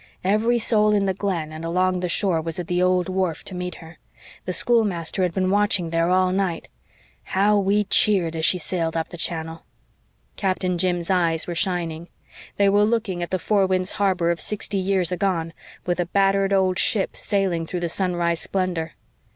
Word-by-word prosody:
"Every 215 +5 +2
soul 215 -2 +3
in 200 -1 +2
the 190 - +1
Glen 180 -5 -3
and 155 +1 -8
along 180 +2 0
the 180 0 -2
shore 170 -2 +3
was 165 0 -4
at 180 - -4
the 180 +2 -1
old 180 0 +2
wharf 185 -4 -2
to - - -7
meet 180 -1 -5
her. 165 +1 -13 0.5
The 185 - -2
schoolmaster 195 -5 0
had 180 -2 +1
been 185 +2 0
watching 200 -4 +1
there 165 +1 +1
all 185 0 +3
night. 185 -3 -2 0.6
How 205 +2 +2
we 200 +2 +2
cheered 190 -5 +2
as 160 - -3
she 180 - +4
sailed 165 -1 -1
up 160 - -2
the - - -9
channel." 165 -1 -3 0.7
Captain 185 -2 -1
Jim's 175 0 -1
eyes 165 -3 +1
were 175 - -4
shining. 170 -2 -2 0.5
They 200 - +4
were 205 +1 +4
looking 215 -5 0
at 175 - -3
the 185 - 0
Four 195 +2 +1
Winds 185 0 0
Harbor 185 -4 +1
of 170 - -3
sixty 205 -1 -3
years 185 -2 +1
agone, 175 -3 -1 0.3
with 175 0 -1
a 175 - 0
battered 195 +1 +2
old 190 -2 +2
ship 200 -4 +1
sailing 185 -5 -1
through 180 +1 -4
the 170 - -1
sunrise 170 -1 -1
splendor. 175 -4 -2
185 Hz, 190 wpm, -23 LUFS, 170-195 Hz, 0.7 s, she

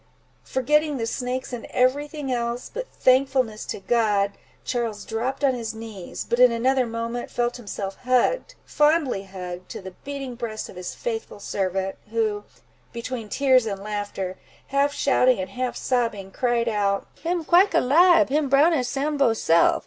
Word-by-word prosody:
Forgetting 300 +3 +1
the 230 - -2
snakes, 250 +2 -3
and 240 - -5
every 260 +4 +2
thing 295 -3 -5
else, 240 0 -2
but - - -4
thankfulness 255 -4 +2
to - - -4
God, 205 -2 +2 0.3
Charles 230 -4 -2
dropped 245 +6 -3
on 270 -2 +4
his 225 -3 -4
knees; 220 -5 -7
but 235 - 0
in 250 -1 +7
another 255 +2 +2
moment, 230 +1 -4
he - - -20
felt 240 0 0
himself 200 -4 -5
hugged, 255 - +1
fondly 295 -9 +2
hugged, 180 -1 -8
to - - -6
the 190 -1 -8
beating 275 -2 -5
breast 230 -3 -5
of - - -11
his 180 0 -6
faithful 225 -3 -4
servant, 190 -1 -2
who, 215 -2 -1 0.5
between 235 -2 -5
tears 260 -3 +3
and 200 -2 -4
laughter, 205 -3 -4 0.3
half 280 +1 +2
shouting, 255 -5 +3
and 185 - -4
half 255 0 -2
sobbing, 230 -6 -1
cried 240 +1 0
out—"Him 215 - -1
quike 365 +5 +5
alibe! 340 +6 +5
him 290 0 +1
brown 290 +5 +5
as 255 -6 +1
Sambo 280 -2 +1
self! 170 -6 +3
240 Hz, 160 wpm, -24 LUFS, 210-270 Hz, 0.5 s, in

